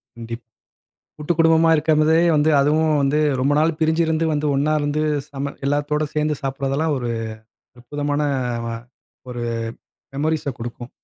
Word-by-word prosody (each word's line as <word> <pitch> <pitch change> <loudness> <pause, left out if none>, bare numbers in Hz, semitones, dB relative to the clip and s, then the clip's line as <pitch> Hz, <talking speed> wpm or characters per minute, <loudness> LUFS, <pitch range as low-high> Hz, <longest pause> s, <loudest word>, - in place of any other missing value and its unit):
கண்டிப் 115 0 -7 0.7
கூட்டு 150 +3 -1
குடும்பமா 165 0 +5
இருக்கன்றதே 155 +1 +3 0.2
வந்து 150 +1 +3
அதுவும் 155 +3 +3
வந்து 140 +2 +2 0.2
ரொம்ப 140 +3 +2
நாளு 160 +2 +3
பிரிஞ்சிருந்து 160 0 +1
வந்து, 150 0 -1
ஒன்னா 145 +3 +1
இருந்து 145 +1 -1 0.3
சம 140 0 -4
எல்லாத்தோட 145 +2 0
சேந்து 150 0 0
சாப்பிட்றதெல்லாம் 135 +3 -1
ஒரு 120 -2 -3 0.7
அற்புதமான 145 +4 -2 0.4
வா 115 0 -3 0.5
ஒரு 120 -1 -4 0.7
மெமோரீஸ 155 +2 -1
குடுக்கும். 120 +1 -7
150 Hz, 125 wpm, -21 LUFS, 135-155 Hz, 0.7 s, குடும்பமா